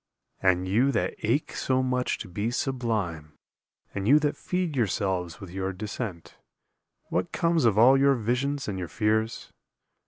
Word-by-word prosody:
And 95 -1 +2
you 120 +9 +3
that 95 -5 0
ache 125 +8 0
so 130 0 +1
much 125 0 0
to - - -7
be 100 +5 -2
sublime, 110 - -2 0.6
And 100 0 -3
you 145 +5 +7
that 150 -1 0
feed 180 -4 -2
yourselves 95 -7 -1
with 95 -3 -9
your 95 +1 -2
descent, 100 -2 -6 0.7
What 90 0 -1
comes 170 -4 +1
of 110 -3 +3
all 125 +4 +7
your 140 0 +4
visions 130 +5 -1
and 95 -3 -3
your 90 - -4
fears? 110 +3 -1
110 Hz, 155 wpm, -27 LUFS, 95-130 Hz, 0.7 s, you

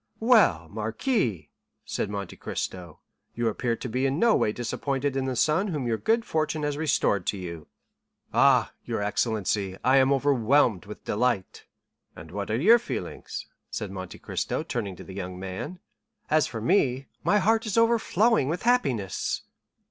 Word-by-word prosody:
"Well, 215 - +4
marquis," 110 - -1 0.3
said 105 - -2
Monte 100 -3 -5
Cristo, 90 -4 -5 0.3
"you 120 0 0
appear 115 +2 -1
to 125 - -6
be 130 +3 0
in 135 +2 -1
no 230 +5 +4
way 105 - +2
disappointed 135 +4 -2
in 135 -1 0
the 130 -1 -2
son 155 - +2
whom 150 -9 -2
your 115 -2 0
good 225 +1 +1
fortune 155 -1 -1
has 145 -1 -1
restored 140 - +1
to 100 - 0
you." 85 -4 -7 0.7
"Ah, - - +4
your 105 - -2
excellency, 105 -2 -1
I 130 +3 +5
am 135 0 +4
overwhelmed 135 - +3
with 105 - -10
delight." 110 -3 -1 0.5
"And - - -11
what - - -4
are 110 - +1
your 220 - +6
feelings?" - - -5 0.2
said 105 -3 -4
Monte 95 -1 -7
Cristo, - - -3
turning 105 -6 -3
to - - -10
the 95 - -10
young 90 -1 -5
man. 95 - -5 0.5
"As 155 0 +4
for 115 -2 -6
me, 135 - +2 0.2
my 210 - +3
heart 220 +3 +2
is 215 - -1
overflowing 230 - +3
with 170 +3 -2
happiness." 135 - 0
125 Hz, 165 wpm, -26 LUFS, 105-155 Hz, 0.7 s, your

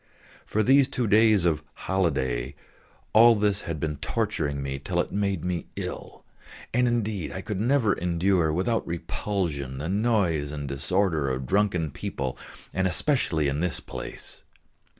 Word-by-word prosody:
For 110 - +1
these 135 +4 +5
two 125 - -1
days 110 -3 +5
of 80 -3 +2
holiday 70 -9 -1 0.6
all 115 +1 +8
this 105 -1 +1
had 85 -2 -4
been 75 -1 -2
torturing 75 -7 -1
me 70 0 -3
till 70 - -2
it - - 0
made 100 -4 -1
me 90 -2 -2
ill. - - -6 0.5
And 125 +1 +3
indeed 110 -7 -1
I 95 - -5
could 105 -1 -4
never 115 -2 +3
endure 85 -1 +1
without 95 +8 0
repulsion 85 -6 -3
the 75 +5 -4
noise 95 -9 +1
and 70 -2 -5
disorder 80 +2 0
of 65 0 -2
drunken 95 -4 +1
people, 65 -2 -4 0.4
and 95 0 +1
especially 90 - +1
in 70 +1 -1
this 90 0 -1
place. - - -7
90 Hz, 150 wpm, -26 LUFS, 75-105 Hz, 0.6 s, all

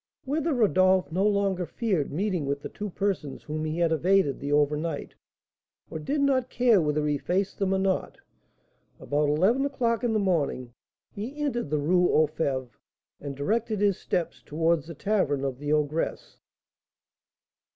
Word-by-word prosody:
Whether 310 +4 0
Rodolph 190 - +3
no 185 +4 0
longer 195 -3 0
feared 190 - -1
meeting 180 -2 -1
with 140 0 -2
the - - -5
two 210 0 -6
persons 185 -8 -3
whom 155 +1 -4
he 155 +1 -3
had 170 -1 +2
evaded 165 -2 +2
the 140 +1 -4
over 145 0 +3
night, 155 -1 -4 0.8
or 160 - -4
did 280 - -1
not 260 -3 +2
care 235 -6 +4
whether 150 -1 0
he 145 -1 0
faced 190 +5 -1
them 195 -1 +1
or 190 - +2
not, 190 -1 -1 0.8
about 145 0 0
eleven 190 - +3
o'clock 240 -4 0
in 235 -2 +1
the - - +2
morning 150 - -1 0.4
he 235 +8 -6
entered 255 - -1
the 150 - +1
Rue 175 +5 +3
aux 155 - +4
Fêves, 135 -5 -2 0.5
and 140 -1 -6
directed 215 +8 -1
his 200 -2 +2
steps 175 -2 -2
towards 160 0 0
the 165 - -8
tavern 145 -8 0
of 130 -2 -3
the 145 0 -3
ogress. 150 +1 -1
175 Hz, 165 wpm, -27 LUFS, 150-205 Hz, 0.8 s, care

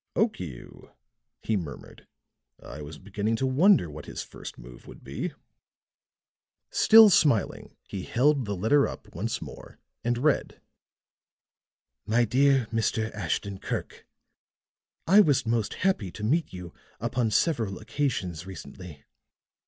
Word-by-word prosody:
"Okiu," 90 - -3 0.5
he 110 - 0
murmured. 80 -9 -7 0.5
"I 75 - -10
was 75 +1 -9
beginning 105 +4 -2
to 130 - -1
wonder 145 - +4
what 75 -1 -10
his - - -5
first - - -10
move - - -13
would - - -13
be." - - -4 1.4
Still 220 -1 +8
smiling, 140 - +2
he 95 - -5
held 135 +5 +2
the 100 -1 -3
letter 115 +10 +3
up - - -10
once - - -3
more, - - -11 0.3
and 120 0 0
read: 145 +4 0 1.5
"MY 115 +2 +3
DEAR 135 +2 +3
MR. 110 -1 0
ASHTON 100 0 -3
KIRK: - - -5 1.0
"I 195 +5 +6
was 145 - +2
most 115 -2 -1
happy 185 - 0
to 105 - -8
meet 155 +10 +1
you 90 -2 -9 0.3
upon 120 -2 0
several 110 - 0
occasions 100 - -3
recently. 90 -5 -10
110 Hz, 125 wpm, -27 LUFS, 95-140 Hz, 1.5 s, Still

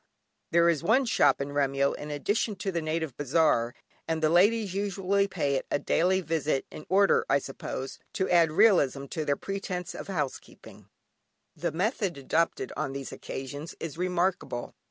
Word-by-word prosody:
There 170 0 +4
is 165 -4 +2
one 255 +5 +3
shop 235 - +3
in 140 +1 -3
Remyo 140 -1 +2
in 150 - -7
addition 205 +8 -1
to 195 +1 -3
the 170 -2 -1
native 155 -3 -2
Bazaar, 145 -5 +2 0.3
and 160 0 0
the 155 - +4
ladies 200 +3 +3
usually 200 0 0
pay 160 -7 -1
it - - -5
a - - +1
daily 180 +6 +2
visit, 155 -4 -1
in 150 - -10
order, 195 +2 +4
I 135 - +5
suppose, 135 -1 -6
to 190 -3 0
add 170 -3 +4
realism 145 - +4
to 155 - -2
their 145 -1 +1
pretence 195 -2 -4
of - - -7
housekeeping. 180 -9 -6 0.7
The - - -2
method 190 - -1
adopted 160 +5 0
on 140 -3 -3
these 135 -1 -6
occasions 145 +4 -7
is 165 -4 -5
remarkable. 180 -8 -1
165 Hz, 165 wpm, -28 LUFS, 140-190 Hz, 0.7 s, I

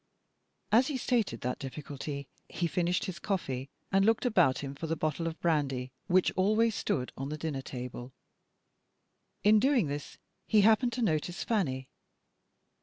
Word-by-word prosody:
As 240 +5 +5
he 285 - -1
stated 240 -4 0
that 125 +1 -2
difficulty, 140 0 -6 0.2
he 175 - -2
finished 175 +2 0
his 175 -2 -5
coffee, 135 -10 -2 0.2
and 195 0 +4
looked 225 +4 +3
about 145 - +3
him 140 0 -4
for 150 +4 -5
the 165 - 0
bottle 155 +2 -1
of 165 0 -5
brandy 135 -6 0 0.2
which 185 -1 +4
always 215 +4 +2
stood 125 -9 -1
on 135 +1 -4
the 155 - -4
dinner 150 -3 -3
table. 125 -1 -7 1.3
In 215 +1 +6
doing 260 - +3
this, 145 0 -5 0.3
he 215 -2 +5
happened 225 +4 +4
to 245 0 -1
notice 175 0 0
Fanny. 135 - -1
165 Hz, 155 wpm, -30 LUFS, 140-215 Hz, 1.3 s, In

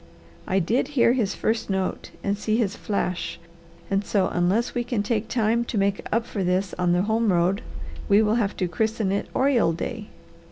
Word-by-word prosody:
I 190 - +1
did 205 +7 +1
hear 235 0 +5
his 220 -6 0
first 225 -1 -1
note 190 -1 -2
and 200 0 0
see 215 +1 0
his 205 -5 0
flash, 185 -3 -2 0.5
and 195 +1 +2
so 195 -2 +1
unless 185 +7 +1
we 245 - -1
can 235 -4 -1
take 220 0 -1
time 230 0 +1
to 235 - -3
make 200 0 +1
up 230 +1 +1
for 200 -4 -3
this 185 +1 0
on 180 -1 +2
the 180 +1 +2
home 220 0 +2
road 180 +3 +2 0.5
we 205 +2 +6
will 210 0 +2
have 200 -2 -2
to 185 - 0
christen 220 +2 -1
it 200 - -1
oriole 255 -10 +3
day. 215 +5 -5
205 Hz, 195 wpm, -24 LUFS, 190-225 Hz, 0.5 s, we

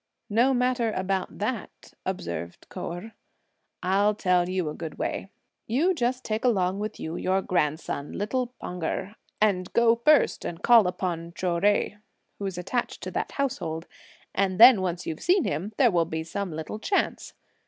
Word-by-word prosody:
"No 240 +5 +4
matter 250 -2 +1
about 190 0 -2
that," 215 +1 -4
observed 85 - -4
Kou - - -5
Erh; 180 +6 -8 0.7
"I'll 200 +3 +3
tell 180 -3 +2
you 185 -3 -1
a 150 - -3
good 160 -1 -7
way; 195 - -3 0.4
you 300 +12 +2
just 255 -4 -1
take 215 0 -2
along 195 -6 +2
with 215 +1 -4
you, 160 +2 -4
your 190 +1 +1
grandson, 150 -3 -1
little 245 +5 -1
Pan 180 -1 -6
Erh, 190 +5 -2 0.3
and 190 -4 +1
go 235 -1 +5
first 300 +6 +4
and 170 - -6
call 230 -5 +7
upon 175 -2 -3
Chou 175 -2 0
Jui, 205 +2 +2 0.4
who 200 - -2
is 190 -2 -5
attached 240 +7 -3
to - - -4
that - - -3
household; 175 - -2 0.5
and 190 -2 +1
when 235 -3 +9
once 180 -1 -2
you've 160 - -4
seen 360 0 +3
him, 170 +9 -2
there 250 -5 +5
will 170 -2 +2
be 160 0 -3
some 190 +3 -4
little 160 +7 -5
chance. 390 - -1
195 Hz, 170 wpm, -26 LUFS, 175-230 Hz, 0.7 s, when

